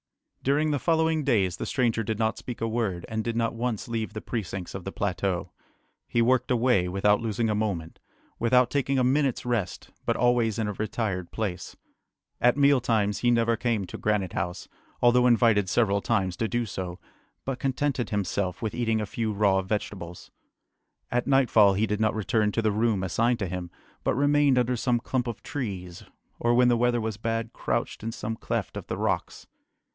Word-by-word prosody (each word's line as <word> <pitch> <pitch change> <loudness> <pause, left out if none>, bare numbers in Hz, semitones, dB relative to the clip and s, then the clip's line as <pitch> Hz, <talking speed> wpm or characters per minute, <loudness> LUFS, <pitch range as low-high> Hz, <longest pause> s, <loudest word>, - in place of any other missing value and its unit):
During 150 +3 +2
the 145 - 0
following 160 -1 +2
days 100 -10 +1
the - - -4
stranger 120 -5 +1
did 110 0 -2
not 110 0 +1
speak 120 -3 -7
a 115 - +1
word, 110 -6 -2
and 110 0 -2
did 115 0 -2
not 115 0 0
once 115 -2 -3
leave 115 -2 -3
the 110 - -5
precincts 95 -5 -5
of 95 - -6
the 95 - -5
plateau. 95 -3 -2 0.6
He 115 - +2
worked 130 +1 +2
away, 120 -7 +3
without 100 +3 +2
losing 115 0 -1
a 110 - +1
moment, 100 -7 -3 0.4
without 125 +1 +3
taking 140 -1 +1
a 130 - +3
minute's 135 0 +1
rest, 110 -7 -2
but - - 0
always 120 -3 +2
in 110 -2 -1
a 105 - -2
retired 100 -4 -3
place. 105 -5 -4 0.7
At 125 +3 +4
meal 140 -2 +5
times 105 -4 +1
he 120 - +2
never 115 -1 +3
came 115 -4 -1
to - - -8
Granite 105 -4 0
House, 90 +1 -3 0.4
although 125 +1 +5
invited 115 -5 +4
several 100 -2 +2
times 95 -6 0
to 115 - 0
do 120 +1 -1
so, 90 -4 -5 0.5
but 135 -2 -3
contented 135 -1 -1
himself 100 0 -2
with 110 - -2
eating 115 -2 0
a 105 - -1
few 110 +2 -2
raw 100 -2 +2
vegetables. 95 -3 -5 0.8
At 125 0 0
nightfall 120 -7 +5
he 105 +3 +2
did 105 -1 -2
not 110 0 +2
return 110 -1 +1
to 115 - 0
the 110 - +2
room 105 -2 +1
assigned 115 +7 +1
to 100 -5 -2
him, 90 0 -5 0.3
but - - +1
remained 145 -1 +3
under 125 0 +2
some 120 0 +1
clump 125 +1 -2
of 115 - -5
trees, 95 -10 -5 0.4
or 120 0 +2
when 125 0 +5
the 120 - +3
weather 120 0 +2
was 110 -2 -3
bad 115 +1 -2
crouched - - -2
in 115 +1 -3
some 110 0 -4
cleft - - -3
of - - -6
the - - -3
rocks. - - -2
115 Hz, 190 wpm, -26 LUFS, 100-125 Hz, 0.8 s, meal